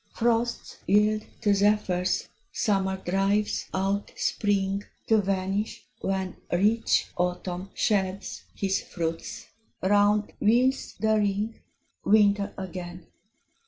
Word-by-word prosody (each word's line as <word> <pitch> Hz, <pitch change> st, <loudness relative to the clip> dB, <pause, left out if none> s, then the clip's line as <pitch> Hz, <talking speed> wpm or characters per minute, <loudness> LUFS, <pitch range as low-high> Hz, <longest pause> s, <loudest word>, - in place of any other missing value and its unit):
Frosts 235 Hz, 0 st, 0 dB
yield 210 Hz, +2 st, +3 dB, 0.2 s
to 205 Hz, -, +3 dB
zephyrs; 195 Hz, -3 st, +1 dB, 0.2 s
Summer 190 Hz, -2 st, 0 dB
drives 195 Hz, +3 st, 0 dB
out 195 Hz, +2 st, -1 dB
Spring, 200 Hz, -1 st, 0 dB, 0.2 s
To 220 Hz, -1 st, +4 dB
vanish, 195 Hz, +2 st, -2 dB
when 190 Hz, -1 st, -2 dB
Rich 210 Hz, +6 st, +2 dB
Autumn 180 Hz, +1 st, -2 dB
sheds 195 Hz, -2 st, -1 dB
his 195 Hz, -1 st, 0 dB
fruits; 165 Hz, -2 st, -4 dB, 0.4 s
round 205 Hz, +2 st, +3 dB
wheels 250 Hz, +5 st, +2 dB
the 220 Hz, 0 st, +3 dB
ring, 210 Hz, +2 st, -1 dB, 0.4 s
Winter 205 Hz, -1 st, +4 dB
again! 180 Hz, -1 st, -7 dB
200 Hz, 95 wpm, -27 LUFS, 190-210 Hz, 0.4 s, To